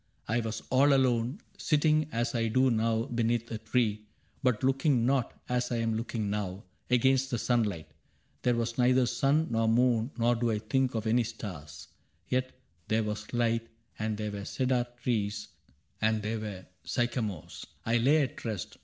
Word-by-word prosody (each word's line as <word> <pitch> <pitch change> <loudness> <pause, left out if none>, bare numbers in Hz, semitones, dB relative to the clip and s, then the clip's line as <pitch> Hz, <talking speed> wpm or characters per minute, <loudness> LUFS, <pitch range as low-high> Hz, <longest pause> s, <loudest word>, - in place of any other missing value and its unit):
I 115 +3 +1
was 110 -1 -4
all 140 +2 +5
alone. 130 - +1 0.2
Sitting 155 -1 +2
as 120 +3 -1
I 115 -2 +1
do 130 +3 +3
now 115 0 +1
beneath 120 -2 -1
a 110 - -3
tree. 110 -2 0 0.3
But 125 -4 +1
looking 135 -2 +2
not, 130 -2 0
as 125 0 -1
I - - +1
am 115 -1 0
looking 110 -1 -2
now. 100 -1 -3 0.3
Against 130 +2 +3
the 120 - -1
sunlight. 105 -9 0 0.6
There 125 -1 +2
was 115 +1 -2
neither 125 +1 +4
sun 135 +6 +1
Nor 115 0 +2
moon, 120 0 +3
nor 120 +1 +3
do 120 0 0
I 110 - +1
think 125 +4 0
of 110 -1 -2
any 120 +2 +3
stars; 90 -10 -8 0.4
Yet 130 0 0 0.4
there 110 +1 +2
was 105 0 -4
light, 115 -1 +1 0.3
and 110 -1 -1
there 105 -1 -3
were 100 -1 -6
cedar 125 -1 0 0.2
trees, 105 -3 -1 0.5
And 110 -1 +1
there 110 +1 -2
were 100 -4 -6 0.2
sycamores. 120 - -3 0.2
I 115 +1 +2
lay 145 +6 +4
at 130 - -5
rest. 105 -8 -4
115 Hz, 170 wpm, -30 LUFS, 110-125 Hz, 0.6 s, all